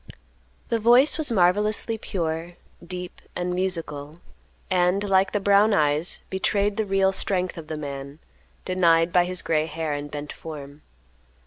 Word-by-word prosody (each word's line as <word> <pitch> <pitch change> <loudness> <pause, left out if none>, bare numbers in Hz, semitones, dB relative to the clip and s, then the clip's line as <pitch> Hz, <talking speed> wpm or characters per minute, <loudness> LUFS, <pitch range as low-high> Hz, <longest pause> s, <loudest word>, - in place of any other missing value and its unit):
The 230 - +1
voice 245 +8 +5
was 300 -5 0
marvelously 210 +3 +2
pure, 170 -4 -4 0.3
deep, 180 0 -7
and 180 0 -2
musical, 165 -5 -2 0.5
and, 180 +2 +2
like 190 0 +3
the 205 - 0
brown 200 +2 +4
eyes, 150 +3 0
betrayed 200 +2 0
the 220 - 0
real 195 0 +3
strength 185 -1 -1
of 165 -3 -9
the 155 - -4
man, 140 -1 -7 0.5
denied 170 -2 +3
by 180 -1 +4
his 180 -1 -2
gray 155 -1 +1
hair 160 -1 -3
and 145 0 -5
bent 150 0 -6
form. 145 -2 -9
180 Hz, 145 wpm, -24 LUFS, 155-195 Hz, 0.5 s, voice